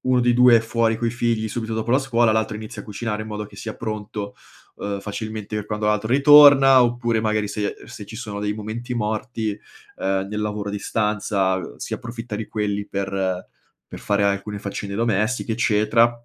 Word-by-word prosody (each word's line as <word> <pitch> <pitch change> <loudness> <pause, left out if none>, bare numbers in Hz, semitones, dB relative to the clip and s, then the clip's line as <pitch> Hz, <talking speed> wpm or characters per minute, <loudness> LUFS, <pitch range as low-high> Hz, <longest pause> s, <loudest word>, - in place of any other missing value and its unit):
1 130 -1 +2
dei 120 0 +3
2 125 0 +7
è 115 - +3
fuori 115 0 +1
coi 115 0 -1
figli 115 -2 -1
subito 110 0 -4
dopo 110 +1 -2
la 130 - +5
scuola, 120 -4 +2
l'altro 110 0 0
inizia 110 0 -8
a - - -16
cucinare 105 +1 -4
in 110 - -8
modo 105 0 -4
che 100 - -16
sia 110 +3 -6
pronto, 105 -2 -5 0.4
uhm, 100 -1 -4
facilmente 110 +1 -5
per 105 -1 -4
quando 105 0 -3
l'altro 105 +1 0
ritorna, 140 -2 +8
oppure 120 -1 0
magari 110 -1 0
se 105 -1 -2
se 115 -3 -9
ci 110 - -9
sono 105 -4 -5
dei 105 0 -1
momenti 110 +4 -5
morti, 110 0 -2 0.5
uhm, 95 0 -1
nel 105 0 -3
lavoro 105 -1 -3
a - - -7
distanza 100 -2 0 0.2
si - - -6
approfitta 115 -2 -6
di 110 - -5
quelli 105 -1 -2
per 100 0 -3 0.8
per - - -9
fare 100 0 0
alcune 100 +1 -1
faccende 100 0 -5
domestiche, 115 +2 0
eccetera, 115 +1 +3
110 Hz, 190 wpm, -22 LUFS, 105-115 Hz, 0.8 s, ritorna